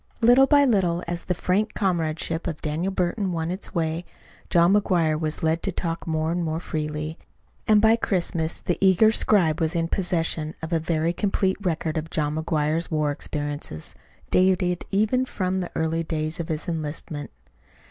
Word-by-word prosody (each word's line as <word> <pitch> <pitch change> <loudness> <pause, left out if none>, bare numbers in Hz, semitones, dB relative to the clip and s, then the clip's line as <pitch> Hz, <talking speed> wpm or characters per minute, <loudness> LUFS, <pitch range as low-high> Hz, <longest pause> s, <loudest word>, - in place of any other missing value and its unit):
Little 245 +3 +6
by 285 -1 +5
little, 180 -8 +2
as 170 0 -3
the 180 - -1
frank 195 +5 0
comradeship 165 -2 -1
of 160 -3 -4
Daniel 160 +5 -1
Burton 185 +1 -1
won 165 0 -2
its 190 +2 -6
way, 165 0 -1 0.5
John 170 +2 +4
McGuire 170 -7 +2
was 155 0 -3
led 160 +1 +1
to 195 - -1
talk 170 -1 -3
more 160 0 0
and 175 0 -1
more 160 0 -2
freely; 155 -1 -4 0.5
and 215 -1 +6
by 220 +1 +5
Christmas 170 -6 -1
the 175 - -1
eager 195 +3 +5
scribe 180 -9 +2
was 160 0 0
in 165 -1 +1
possession 165 -4 -1
of 160 +2 -3
a 165 - +3
very 165 +1 0
complete 195 0 0
record 165 -4 -1
of 160 +1 -3
John 150 -2 -1
McGuire's 155 +1 -1
war 150 -2 +1
experiences, 145 - -5 0.4
dating 185 -1 +3
even 215 +6 +2
from 190 -6 -2
the 180 - -3
early 160 +1 0
days 155 0 -3
of 165 - -3
his 155 -1 -3
enlistment. 155 -2 -4
170 Hz, 170 wpm, -24 LUFS, 160-185 Hz, 0.5 s, Little